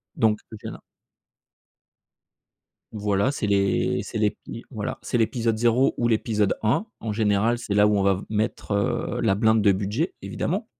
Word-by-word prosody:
donc 110 -1 +2
le 110 - -9
féra 110 - -7 2.1
Voilà 105 +3 0
c'est 110 - -3
l'é 100 -1 +1
c'est - - -5
l'épi 105 +2 -3
voilà, 110 -6 -5
c'est 120 - -1
l'épisode 115 -1 0
0 120 +3 +3
ou 120 - +1
l'épisode 110 -3 +1
1. 120 - +2
En 110 - -4
général, 110 +2 +1
c'est 120 -4 -4
là 105 0 +5
où 105 - +2
on 100 - +1
va 100 0 +4
v 95 - -6
mettre, 110 0 -2
heu, 100 0 -1
la 95 - +2
blinde 110 +1 +3
de 100 -1 +5
budget, 105 - -1
évidemment. - - -3
110 Hz, 165 wpm, -24 LUFS, 100-115 Hz, 2.1 s, là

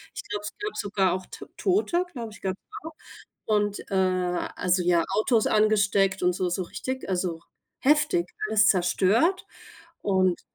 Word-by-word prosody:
ich - - -5
glaube, 205 0 -4
es 210 - -7
gab 420 +1 -5
sogar 195 -3 0
auch 185 0 -5
T - - -10
Tote, 370 -2 +1
glaube 230 -5 -6
ich, - - -15
gab's 190 0 -3 0.2
auch. 325 0 -8 0.5
Und, 205 -1 0
äh, - - -3
also, 180 -1 0
ja, 175 -1 +3 0.2
Autos 220 0 +2
angesteckt 205 -3 +2
und 180 0 +3
so 180 0 -1
so 180 +2 -2
richtig 260 +8 -5
also, 180 -3 -2 0.4
heftig, 290 - +3 0.2
alles 215 -1 +4
zerstört. 200 - +2 0.6
Und 185 -3 +1
195 Hz, 155 wpm, -26 LUFS, 180-220 Hz, 0.6 s, alles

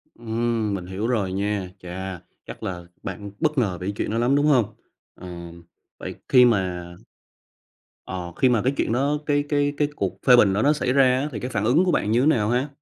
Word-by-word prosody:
Ừm, 115 -2 -1
mình 95 -3 -4
hiểu 95 +5 -3
rồi 105 -7 0
nha. 100 -1 -2
Chà. 90 0 -6 0.2
Chắc - - -10
là 90 -2 -4 0.2
bạn 100 -1 -6
bất 155 -2 0
ngờ 100 -8 +1
về 90 - -6
cái 100 - -2
chuyện - - -2
đó 115 - -1
lắm, 120 +4 +2
đúng 145 +1 +2
hông? 120 -7 +2 0.4
Ừm. 85 -1 -10 0.4
Vậy - - -6
khi 125 -1 +7
mà 95 -6 +1 1.2
ờ, 90 -2 -5
khi 130 - +3
mà 120 -3 +2
cái 130 +4 +1
chuyện - - 0
đó 140 +4 +1
cái 145 -1 +1
cái 145 -1 +1
cái 145 - +2
cuộc - - -3
phê 125 - +9
bình 105 -5 +5
đó 100 - +1
nó 145 +4 +4
xảy 130 -4 -1
ra 135 0 +5 0.2
á 140 - -1
thì 110 - -5
cái 125 - -4
phản 105 -5 -2
ứng 145 +11 +4
của 180 - +2
bạn 105 - 0
như 115 - +3
thế - - +2
nào 110 -9 +2
ha? 125 +4 +1
115 Hz, 230 wpm, -23 LUFS, 95-130 Hz, 1.2 s, phê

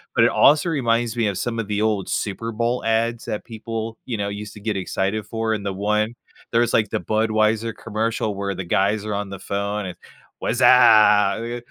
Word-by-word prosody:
But - - +5
it - - +5
also 155 +5 +4
reminds 120 -6 0
me 115 - +1
of 100 - -2
some 120 -1 -3
of 105 - -3
the 105 0 -1
old 105 -3 0
Super 115 +3 -3
Bowl 120 +2 -1
ads 115 +1 0
that 105 - -4
people, 115 -1 -6
you 120 - -3
know, 100 0 -2
used 105 +1 -7
to 105 - -11
get 105 -2 -2
excited 95 +3 -2
for, 110 -1 -1
and 100 -1 -6
the 100 - -2
one 105 +3 0 0.4
there 115 0 +3
was, 120 - +1
like, 110 -2 +2
the - - 0
Budweiser 110 +1 +1
commercial 110 -1 -2
where 100 0 -3
the 95 - -4
guys 100 +4 +1
are 105 - -3
on 100 -1 -3
the 100 -1 -7
phone 100 +1 -3
and, 90 - -8 0.4
"Wuzzup! 115 -1 +4
110 Hz, 205 wpm, -22 LUFS, 105-115 Hz, 0.4 s, But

